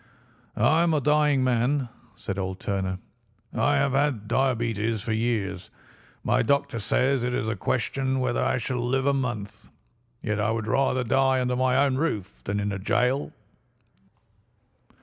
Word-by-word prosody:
"I 150 Hz, +9 st, +3 dB
am 170 Hz, -2 st, +2 dB
a -, -, +3 dB
dying 150 Hz, -1 st, +3 dB
man," 130 Hz, +2 st, +1 dB, 0.3 s
said 95 Hz, 0 st, -5 dB
old 95 Hz, 0 st, -3 dB
Turner. 95 Hz, -2 st, -2 dB, 0.6 s
"I 145 Hz, +1 st, +2 dB
have 140 Hz, 0 st, +2 dB
had 135 Hz, -6 st, 0 dB
diabetes 115 Hz, -4 st, 0 dB
for 110 Hz, -, -3 dB
years. 110 Hz, -5 st, -2 dB, 0.5 s
My -, -, +2 dB
doctor 135 Hz, -1 st, +1 dB
says 130 Hz, +5 st, +1 dB
it 125 Hz, +1 st, -1 dB
is 110 Hz, -, -1 dB
a 110 Hz, -, -1 dB
question 130 Hz, +6 st, -1 dB
whether 125 Hz, -2 st, 0 dB
I -, -, +1 dB
shall 125 Hz, 0 st, -2 dB
live 130 Hz, +2 st, 0 dB
a 140 Hz, -, +3 dB
month. 110 Hz, -6 st, -4 dB, 0.5 s
Yet 105 Hz, -2 st, -1 dB
I 105 Hz, +1 st, +1 dB
would 110 Hz, -1 st, -1 dB
rather 130 Hz, +3 st, +1 dB
die 130 Hz, +1 st, +2 dB
under 125 Hz, 0 st, 0 dB
my 130 Hz, 0 st, +2 dB
own 130 Hz, -2 st, 0 dB
roof 105 Hz, -, -3 dB
than 100 Hz, +1 st, -1 dB
in 105 Hz, 0 st, -1 dB
a 100 Hz, -, -4 dB
gaol." 125 Hz, +7 st, 0 dB
125 Hz, 160 wpm, -26 LUFS, 105-135 Hz, 0.6 s, I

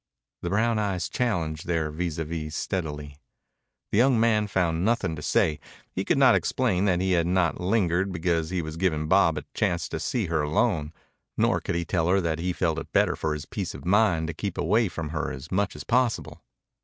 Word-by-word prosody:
The 85 Hz, -, -3 dB
brown 110 Hz, +3 st, +1 dB
eyes 95 Hz, -4 st, -1 dB
challenged 85 Hz, -11 st, -2 dB
their 80 Hz, -3 st, 0 dB
vis 85 Hz, +1 st, -3 dB
à 80 Hz, -, -2 dB
vis 75 Hz, -1 st, -5 dB
steadily. 75 Hz, -6 st, -4 dB, 0.7 s
The 105 Hz, -, +2 dB
young 125 Hz, -1 st, +4 dB
man 110 Hz, -2 st, +3 dB
found 85 Hz, -4 st, 0 dB
nothing 100 Hz, -6 st, +1 dB
to 75 Hz, -, -8 dB
say. 75 Hz, 0 st, +1 dB, 0.3 s
He -, -, -2 dB
could -, -, +1 dB
not -, -, +6 dB
explain 95 Hz, +2 st, +1 dB
that 90 Hz, -3 st, +2 dB
he 95 Hz, 0 st, 0 dB
had 85 Hz, -2 st, +2 dB
not 90 Hz, -1 st, +1 dB
lingered 95 Hz, -1 st, +1 dB
because 85 Hz, -2 st, 0 dB
he 90 Hz, -2 st, -2 dB
was 80 Hz, +1 st, -6 dB
giving 80 Hz, -4 st, 0 dB
Bob 85 Hz, -3 st, +4 dB
a 75 Hz, -, -4 dB
chance 85 Hz, -6 st, 0 dB
to -, -, -4 dB
see 120 Hz, -5 st, -1 dB
her 80 Hz, -2 st, 0 dB
alone, 75 Hz, 0 st, 0 dB, 0.5 s
nor -, -, +2 dB
could -, -, -3 dB
he 85 Hz, 0 st, -1 dB
tell 85 Hz, -2 st, 0 dB
her 95 Hz, +2 st, +3 dB
that 85 Hz, -3 st, -1 dB
he 90 Hz, +2 st, -1 dB
felt 85 Hz, -3 st, 0 dB
it -, -, -9 dB
better -, -, +3 dB
for 80 Hz, -1 st, -2 dB
his 75 Hz, -, -7 dB
peace -, -, -5 dB
of -, -, -10 dB
mind 95 Hz, -4 st, +3 dB
to 80 Hz, -, -4 dB
keep 100 Hz, +3 st, -4 dB
away 105 Hz, +6 st, +2 dB
from 80 Hz, -4 st, -5 dB
her 75 Hz, 0 st, -2 dB
as 65 Hz, +4 st, -8 dB
much 100 Hz, +1 st, 0 dB
as -, -, -7 dB
possible. 120 Hz, -1 st, 0 dB
85 Hz, 215 wpm, -26 LUFS, 80-100 Hz, 0.7 s, not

